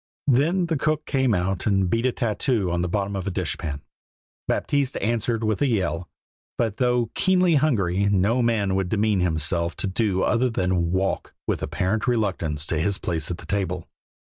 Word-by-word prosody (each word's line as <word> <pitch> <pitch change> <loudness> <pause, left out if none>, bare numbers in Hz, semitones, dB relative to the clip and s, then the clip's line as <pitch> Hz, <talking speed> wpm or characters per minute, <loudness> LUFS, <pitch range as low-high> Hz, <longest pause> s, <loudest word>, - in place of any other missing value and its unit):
Then 155 +8 +3
the 165 -2 -1
cook 155 +1 0
came 130 -5 +1
out 90 +2 -1
and 95 -3 +2
beat 115 +7 +1
a - - +1
tattoo 115 -4 0
on 85 0 0
the 90 - 0
bottom 100 +1 -1
of 95 0 -4
a - - -1
dishpan. 75 -4 -3 0.7
Baptiste 140 -2 0
answered 115 +1 -1
with 110 +2 0
a 145 - +4
yell. 90 - -1 0.5
But 110 -4 -1
though 125 -2 +1
keenly 185 -2 +3
hungry, 100 - +2
no 100 +5 +2
man 110 -5 +1
would 95 -1 0
demean 105 -1 +1
himself 85 0 +1
to - - 0
do 95 -1 0
other 125 +1 +2
than 90 -5 0
walk 95 +1 -1
with - - -1
apparent 105 +6 -1
reluctance 90 -10 0
to 80 - -1
his 95 +4 +1
place 80 -5 -3
at 90 - -3
the - - -12
table. 95 -4 -2
100 Hz, 180 wpm, -24 LUFS, 90-120 Hz, 0.7 s, a